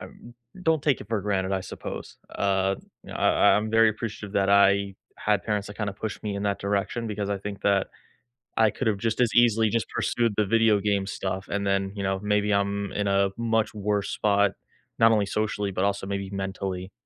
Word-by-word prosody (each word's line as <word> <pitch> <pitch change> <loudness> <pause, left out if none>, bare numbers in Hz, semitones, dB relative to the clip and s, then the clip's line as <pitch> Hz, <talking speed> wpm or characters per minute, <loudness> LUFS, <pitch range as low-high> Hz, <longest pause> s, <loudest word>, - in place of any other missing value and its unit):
I - - -7 0.6
don't 160 -3 +2
take 145 -6 +2
it - - -10
for 110 -2 0
granted, 95 -1 -1
I 95 - 0
suppose. - - -7 0.2
Uh, 95 -1 +1 0.3
you - - -11
know, - - -5
I - - +2 0.2
I - - +4
I'm 110 +1 -1
very 115 0 +5
appreciative 105 -2 -6
that 100 -1 +2
I 100 0 +4 0.2
had 105 -2 0
parents 105 -2 -1
that 105 - -10
kinda 105 -2 -2
pushed 105 +2 -6
me 105 -2 -3
in 100 - -3
that 100 -1 0
direction 100 +4 -2
because 105 -1 -3
I 100 - -1
think 100 0 -7
that 100 -1 +2 0.7
I 110 -1 +5
could 110 +4 -3
have 105 - +1
just 115 +3 -1
as 120 -2 +3
easily 115 -2 +4
just 115 0 -1
pursued 115 -2 0
the 105 - +3
video 110 0 +3
game 100 -1 0
stuff 95 -1 -4
and 100 0 -2
then, 100 0 0
you 100 - -4
know, 95 0 0
maybe 105 0 +1
I'm 100 0 0
in 105 -1 -1
a 100 0 +3
much 115 -2 0
worse 105 -1 -1
spot, 100 -1 +2 0.5
not 115 0 +6
only 105 -2 +3
socially, 105 -1 -2
but, 95 0 -1
also 100 -1 -1
maybe 100 -1 -3
mentally. 95 -1 -4
100 Hz, 215 wpm, -26 LUFS, 100-110 Hz, 0.7 s, not